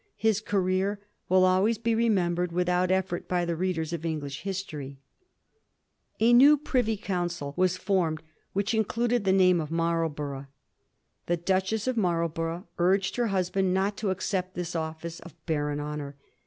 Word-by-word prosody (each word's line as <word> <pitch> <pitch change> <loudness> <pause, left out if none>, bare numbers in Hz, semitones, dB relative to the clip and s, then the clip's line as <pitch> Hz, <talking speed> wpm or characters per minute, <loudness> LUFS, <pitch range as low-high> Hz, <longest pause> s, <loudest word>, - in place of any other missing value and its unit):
His 220 -1 +2
career 195 0 0 0.3
will 185 0 +5
always 190 +5 +3
be 230 +1 0
re 230 +1 +2
membered 175 -3 +1
without 180 +1 +1
eflfort 185 -2 -1
by 180 -1 0
the 170 -1 -1
readers 170 -2 -2
of 170 - -3
EngUsh 150 -4 -4
histoiy. 160 -8 -5 1.2
A 230 +2 +5
new 280 +5 +8
Privy 245 -6 0
Council 175 -7 -3
was 185 0 +2
formed 180 -6 0 0.3
which 200 +3 -1
included 230 +1 0
the 190 - +4
name 185 -2 +4
of 150 - -5
Marlborough. 160 -4 -2 0.8
The 175 - +1
Duchess 190 +5 0
of 255 -2 -1
Marl 170 -5 +1
borough 165 +3 -4
urged 190 +2 +2
her 240 -1 +1
husband 190 -1 0
not 195 +2 +1
to 210 - -1
accept 185 0 -2
this 175 -1 -4
office 160 +1 -4
of 170 -3 -13
barren 150 -3 -1
honour. 145 -1 -5
180 Hz, 155 wpm, -27 LUFS, 165-195 Hz, 1.2 s, new